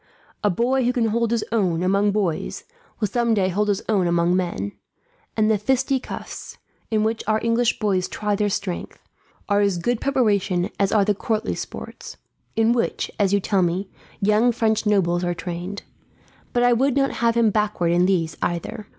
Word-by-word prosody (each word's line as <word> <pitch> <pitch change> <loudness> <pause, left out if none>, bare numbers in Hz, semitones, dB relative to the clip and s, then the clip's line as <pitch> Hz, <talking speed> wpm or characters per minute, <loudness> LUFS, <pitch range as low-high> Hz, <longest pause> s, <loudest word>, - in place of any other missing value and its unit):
A 205 - +4
boy 250 +7 +1
who 245 - +2
can 235 -3 +1
hold 235 +1 +1
his 230 -1 0
own, 180 -7 +1
among 200 +2 +2
boys, 195 -6 -2 0.4
will 215 - +1
some 235 +2 +1
day 190 -2 +2
hold 205 +3 0
his 205 -1 0
own 195 -5 +2
among 170 +1 +2
men; 170 - -2 0.7
and 215 -1 +3
the 215 -2 +2
fisticuffs, 265 +3 -2 0.3
in 215 -1 +1
which 220 +1 -1
our 215 0 +2
English 230 +1 +2
boys 195 -4 0
try 210 -1 -2
their 205 0 +1
strength, 190 -2 -4 0.5
are 205 0 +2
as 200 -3 +2
good 240 +7 -1
preparation 205 -9 +1
as 200 -1 +2
are 205 -3 +3
the 210 - +2
courtly 220 +2 -2
sports; - - -8 0.4
in 225 +1 +3
which, 240 - -1
as 200 -2 +3
you 200 - +3
tell 195 0 +1
me, 180 +3 -1 0.3
young 215 +4 +3
French 220 -2 0
nobles 180 -4 +2
are 175 0 -1
trained. 175 +4 -5 0.7
But 245 - +1
I 245 0 +5
would 270 +3 +2
not 275 0 +2
have 230 0 +3
him 230 -2 +4
backward 210 -5 0
in 175 +1 +3
these, 165 -5 0
either. 175 +5 -3
210 Hz, 185 wpm, -23 LUFS, 185-230 Hz, 0.7 s, I